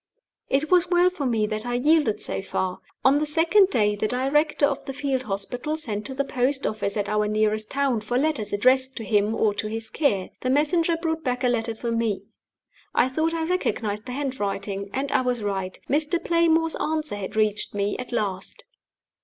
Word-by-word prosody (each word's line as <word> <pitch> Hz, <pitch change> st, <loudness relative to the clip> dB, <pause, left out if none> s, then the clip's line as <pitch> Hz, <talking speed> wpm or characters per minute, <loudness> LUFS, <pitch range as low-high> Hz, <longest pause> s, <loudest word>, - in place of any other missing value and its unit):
It 280 Hz, +5 st, +1 dB
was 360 Hz, -1 st, +4 dB
well 355 Hz, 0 st, +4 dB
for 295 Hz, -7 st, -3 dB
me 225 Hz, -3 st, +1 dB
that 215 Hz, 0 st, -3 dB
I 245 Hz, 0 st, -2 dB
yielded 290 Hz, -3 st, +3 dB
so -, -, -4 dB
far. 185 Hz, -1 st, -2 dB, 0.3 s
On 275 Hz, +2 st, +5 dB
the 305 Hz, -, 0 dB
second 335 Hz, +6 st, +4 dB
day 210 Hz, -, +2 dB
the 210 Hz, +1 st, -1 dB
director 285 Hz, +5 st, +2 dB
of 280 Hz, -1 st, -1 dB
the 270 Hz, -, -5 dB
field 270 Hz, -2 st, -1 dB
hospital 245 Hz, +8 st, -3 dB
sent 210 Hz, -8 st, -3 dB
to 265 Hz, -, -7 dB
the 280 Hz, -, +1 dB
post 265 Hz, +1 st, 0 dB
office 215 Hz, -1 st, -2 dB
at 205 Hz, -1 st, -1 dB
our 210 Hz, 0 st, +1 dB
nearest 215 Hz, 0 st, 0 dB
town 270 Hz, -5 st, 0 dB
for 240 Hz, +3 st, -1 dB
letters 265 Hz, -7 st, 0 dB
addressed 260 Hz, +5 st, +2 dB
to 225 Hz, -, -5 dB
him 210 Hz, 0 st, +1 dB
or 215 Hz, -2 st, +2 dB
to 215 Hz, -, -3 dB
his 225 Hz, +1 st, -5 dB
care. 205 Hz, -12 st, 0 dB
The 255 Hz, -, -2 dB
messenger 325 Hz, +4 st, +2 dB
brought 325 Hz, -1 st, -2 dB
back 250 Hz, -1 st, -1 dB
a 250 Hz, -, +3 dB
letter 230 Hz, -1 st, -1 dB
for 235 Hz, +1 st, -3 dB
me. 225 Hz, -4 st, 0 dB, 0.7 s
I 255 Hz, -, +4 dB
thought 320 Hz, +5 st, 0 dB
I 325 Hz, -, -1 dB
recognized 225 Hz, -, -1 dB
the 250 Hz, -, -4 dB
handwriting, 205 Hz, -7 st, -3 dB
and 275 Hz, +1 st, -2 dB
I -, -, +3 dB
was 250 Hz, -3 st, -1 dB
right. 190 Hz, -2 st, -3 dB
Mr. 300 Hz, +4 st, +1 dB
Playmore's 330 Hz, -1 st, +3 dB
answer 310 Hz, -8 st, -2 dB
had 195 Hz, 0 st, -6 dB
reached 215 Hz, -1 st, 0 dB
me 200 Hz, 0 st, 0 dB
at 250 Hz, -, -6 dB
last! 205 Hz, -, -3 dB
250 Hz, 200 wpm, -25 LUFS, 210-300 Hz, 0.7 s, On